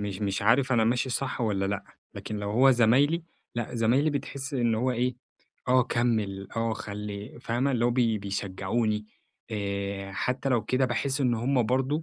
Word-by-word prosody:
مش 105 Hz, -1 st, -4 dB
مش 100 Hz, -1 st, -1 dB
عارف 130 Hz, +4 st, +4 dB
أنا 115 Hz, -2 st, +4 dB
ماشي 125 Hz, +2 st, +1 dB
صَح 130 Hz, 0 st, -2 dB
والّا 100 Hz, -4 st, 0 dB
لأ، 100 Hz, 0 st, -2 dB, 0.3 s
لكن 105 Hz, -, -5 dB
لو 100 Hz, 0 st, -3 dB
هو 130 Hz, +5 st, +5 dB
زَمايلي 135 Hz, +8 st, +4 dB, 0.3 s
لأ، 120 Hz, +1 st, -3 dB
زمايلي 125 Hz, +7 st, +3 dB
بتحس 140 Hz, 0 st, -4 dB
إن 120 Hz, -3 st, +2 dB
هو 125 Hz, +4 st, +1 dB
إيه، 125 Hz, +1 st, 0 dB, 0.5 s
آه 130 Hz, 0 st, +5 dB
كمّل، 110 Hz, -6 st, -1 dB
آه 115 Hz, 0 st, +1 dB
خلي 105 Hz, +1 st, -6 dB
فاهمة؟ 125 Hz, +3 st, 0 dB
اللي 120 Hz, -1 st, +1 dB
هو 120 Hz, -, +4 dB
بي 115 Hz, -3 st, +2 dB
بيشجعوني، 100 Hz, +2 st, -2 dB, 0.4 s
آآ 100 Hz, -2 st, -3 dB
حتى 125 Hz, +6 st, -1 dB
لو 120 Hz, -4 st, +2 dB
كده 130 Hz, +3 st, +1 dB
باحس 140 Hz, +2 st, -1 dB
إنّ 125 Hz, -3 st, +3 dB
هُم 125 Hz, +2 st, +1 dB
برضو، 135 Hz, +5 st, +1 dB
115 Hz, 175 wpm, -27 LUFS, 105-130 Hz, 0.5 s, هو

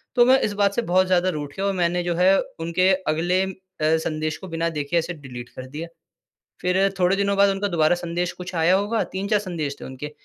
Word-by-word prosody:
तो 240 Hz, -1 st, +6 dB
मैं 260 Hz, +1 st, +6 dB
इस 205 Hz, -, 0 dB
बात 200 Hz, -1 st, +2 dB
से 235 Hz, -, +1 dB
बहुत 185 Hz, -2 st, +2 dB
ज़्यादा 185 Hz, 0 st, +2 dB
रूठ 145 Hz, -4 st, -5 dB
गया 195 Hz, -, -2 dB
और 200 Hz, -, +1 dB
मैंने 175 Hz, -1 st, 0 dB
जो 175 Hz, -1 st, -1 dB
है 185 Hz, +2 st, +5 dB, 0.2 s
उनके 170 Hz, +3 st, +2 dB, 0.2 s
अगले 175 Hz, +4 st, +1 dB
अ, 190 Hz, 0 st, -4 dB, 0.3 s
संदेश 155 Hz, 0 st, 0 dB
को 190 Hz, -, -10 dB
बिना 165 Hz, 0 st, -1 dB
देखे 150 Hz, +2 st, -2 dB
ऐसे 170 Hz, +1 st, -1 dB
डिलीट 125 Hz, -5 st, -9 dB
कर 130 Hz, -, -9 dB
दिया। 155 Hz, +5 st, -6 dB, 0.7 s
फिर 190 Hz, +2 st, +2 dB
थोड़े 180 Hz, +2 st, +3 dB
दिनों 200 Hz, 0 st, +1 dB
बाद 200 Hz, 0 st, +5 dB
उनका 200 Hz, +1 st, -1 dB
दोबारा 170 Hz, -1 st, +3 dB
संदेश 175 Hz, 0 st, -2 dB
कुछ 180 Hz, 0 st, -8 dB
आया 165 Hz, +3 st, +3 dB
होगा, 210 Hz, +3 st, 0 dB
3-4 200 Hz, +3 st, -1 dB
संदेश 160 Hz, -8 st, -4 dB
थे -, -, -8 dB
उनके, 130 Hz, +3 st, -7 dB
175 Hz, 225 wpm, -23 LUFS, 160-195 Hz, 0.7 s, तो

